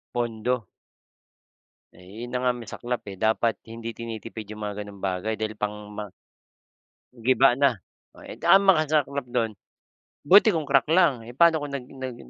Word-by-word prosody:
Pondo. 120 Hz, 0 st, -1 dB, 1.3 s
Eh, 90 Hz, -, -17 dB, 0.2 s
’yon -, -, -9 dB
na 125 Hz, -, 0 dB
nga 125 Hz, -, +2 dB
ang 125 Hz, -, -7 dB
masaklap 120 Hz, +2 st, -4 dB
eh. -, -, -8 dB
Dapat 110 Hz, +1 st, +2 dB, 0.2 s
hindi 115 Hz, 0 st, -6 dB
tinitipid 110 Hz, -2 st, -7 dB
yung 105 Hz, -, -10 dB
mga 105 Hz, 0 st, -4 dB
gano’ng 100 Hz, -1 st, -10 dB
bagay 95 Hz, +3 st, -1 dB
dahil 110 Hz, 0 st, -3 dB
pangma 105 Hz, 0 st, -5 dB, 1.0 s
Giba 130 Hz, +2 st, +4 dB
na. 140 Hz, -5 st, +3 dB, 0.5 s
Eh, -, -, -10 dB
ang 195 Hz, +1 st, +7 dB
masaklap 150 Hz, -6 st, +2 dB
doon, 120 Hz, -2 st, -1 dB, 0.7 s
buti 200 Hz, +7 st, +6 dB
kung 155 Hz, -4 st, -3 dB
crack 135 Hz, -2 st, +4 dB
lang, 155 Hz, -8 st, +3 dB
eh, 120 Hz, -, -10 dB
paano 160 Hz, +1 st, +4 dB
kung 140 Hz, -, -8 dB
nag 135 Hz, -3 st, -4 dB
nag 130 Hz, -2 st, -7 dB
120 Hz, 155 wpm, -25 LUFS, 110-140 Hz, 1.3 s, ang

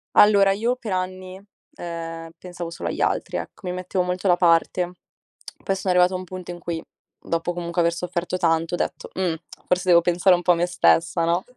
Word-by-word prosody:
Allora, 200 Hz, -2 st, +6 dB
io 230 Hz, +5 st, 0 dB
per 230 Hz, -5 st, -7 dB
anni, 185 Hz, +1 st, -4 dB, 0.3 s
ehm, 165 Hz, -1 st, -6 dB
pensavo 175 Hz, -1 st, -7 dB
solo 170 Hz, -, -5 dB
agli -, -, -4 dB
altri, -, -, 0 dB
ecco. 205 Hz, -4 st, -7 dB
Mi 180 Hz, -, -2 dB
mettevo 180 Hz, 0 st, -1 dB
molto 180 Hz, +2 st, -2 dB
da 175 Hz, -, +5 dB
parte. 175 Hz, +1 st, +2 dB, 0.7 s
Poi 195 Hz, -, 0 dB
sono 190 Hz, -1 st, -1 dB
arrivata 180 Hz, +1 st, +4 dB
a -, -, -1 dB
un 185 Hz, -, -7 dB
punto 185 Hz, 0 st, -8 dB
in 175 Hz, -, -8 dB
cui, 170 Hz, -1 st, -4 dB, 0.4 s
dopo 170 Hz, +1 st, -2 dB
comunque 170 Hz, 0 st, -2 dB
aver 170 Hz, 0 st, +2 dB
sofferto 180 Hz, +1 st, -3 dB
tanto, 165 Hz, -1 st, +1 dB
ho -, -, -5 dB
detto: -, -, -3 dB
"Mh, 185 Hz, -3 st, 0 dB, 0.3 s
forse 180 Hz, 0 st, 0 dB
devo 170 Hz, -1 st, +7 dB
pensare 175 Hz, +2 st, +4 dB
un 175 Hz, -, -4 dB
po' 180 Hz, -, +4 dB
a -, -, +5 dB
me 170 Hz, +1 st, +1 dB
stessa, 170 Hz, -1 st, +2 dB
no?" 170 Hz, +2 st, +1 dB
180 Hz, 205 wpm, -23 LUFS, 170-185 Hz, 0.7 s, devo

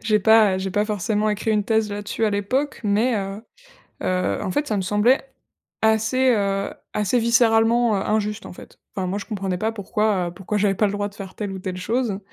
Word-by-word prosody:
que -, -, -10 dB
j'ai 215 Hz, -1 st, +4 dB
pas, 215 Hz, -2 st, +5 dB
heu, -, -, -2 dB
j'ai 190 Hz, 0 st, -3 dB
pas 205 Hz, +2 st, +1 dB
forcément 210 Hz, 0 st, -1 dB
écrit 210 Hz, +2 st, -1 dB
une 210 Hz, -2 st, +1 dB
thèse, 220 Hz, -1 st, +1 dB
là-dessus, 205 Hz, +2 st, -3 dB
à 215 Hz, -, +2 dB
l'époque. 255 Hz, +8 st, -1 dB
Mais, 215 Hz, +4 st, +2 dB
heu 195 Hz, +1 st, -4 dB, 0.6 s
heu, 185 Hz, 0 st, 0 dB
en -, -, -2 dB
fait, 290 Hz, +11 st, -1 dB
ça 215 Hz, -7 st, -1 dB
me 195 Hz, -, 0 dB
semblait 210 Hz, +7 st, +3 dB, 0.6 s
assez, 220 Hz, +4 st, +3 dB
heu, 200 Hz, -3 st, 0 dB, 0.2 s
assez 210 Hz, +4 st, +1 dB
viscéralement, 230 Hz, -1 st, +3 dB
heu, 195 Hz, -, -1 dB
injuste, 210 Hz, 0 st, -1 dB
en -, -, -9 dB
fait. -, -, -14 dB, 0.2 s
Enfin, 185 Hz, -2 st, -1 dB
moi, 195 Hz, +3 st, -2 dB
je 205 Hz, -, -6 dB
comprenais 195 Hz, -4 st, -3 dB
pas 220 Hz, +3 st, -1 dB
pourquoi, 205 Hz, -3 st, 0 dB
heu, -, -, -6 dB
pourquoi 195 Hz, +3 st, -3 dB
j'avais 200 Hz, -1 st, +2 dB
pas 210 Hz, -, +2 dB
le 200 Hz, -, -2 dB
droit 205 Hz, 0 st, -2 dB
de 200 Hz, -, -17 dB
faire 195 Hz, -2 st, -9 dB
telle 205 Hz, -2 st, -4 dB
ou 190 Hz, -, -6 dB
telle 185 Hz, -1 st, -5 dB
chose. 220 Hz, +1 st, -1 dB
210 Hz, 230 wpm, -22 LUFS, 195-225 Hz, 0.6 s, pas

